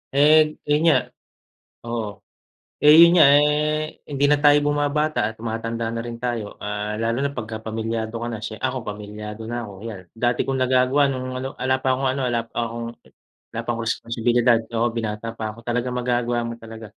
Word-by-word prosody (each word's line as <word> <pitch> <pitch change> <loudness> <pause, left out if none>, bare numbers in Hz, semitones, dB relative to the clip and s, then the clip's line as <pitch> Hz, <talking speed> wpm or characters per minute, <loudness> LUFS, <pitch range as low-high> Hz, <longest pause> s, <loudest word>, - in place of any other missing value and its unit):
Eh, 150 +2 +7 0.3
yun 150 +1 +3
nga. - - +5 0.9
Oo, 115 -2 -3 0.8
eh, 150 +1 +9
yun 170 - +9
nga, 155 - +9
eh, 150 +1 +1
hindi 140 -1 -1
na 150 - +4
tayo 145 0 +6
bumabata 145 -3 +1
at 110 - -4
tumatanda 115 0 -3
na 115 - -4
rin 120 0 -7
tayo. 115 -4 -3
Ah, 105 +1 -3
lalo 115 +2 0
na 140 0 -1
'pagkapamilyado 110 0 -4
ka - - -2
na. 115 - -4
Siye 110 0 -7
ako 130 -2 -2
pamilyado 105 +1 -7
na 120 -2 -3
ako. 100 - -10
Ayan, 110 -5 -6
dati 120 +1 0
kong 135 - -1
nagagawa 130 +2 +3
nung 130 -1 -4
ano, 130 +1 -3
'ala 130 0 0
pa 130 - 0
akong 135 -1 0
ano 140 - -3
ala 120 -1 +1
pa - - -38
akong, 115 0 -4 0.6
wala 115 - -4
pa 115 - -20
akong 115 0 -4
responsibilidad. 120 0 +2
Oo, 115 0 +1
binata 115 0 -4
pa 110 -1 -4
ako, 110 - -12
talagang 125 +1 -1
magagawa 120 -1 0
mo 115 - -4
talaga. 115 -1 -10
120 Hz, 185 wpm, -23 LUFS, 115-135 Hz, 0.9 s, eh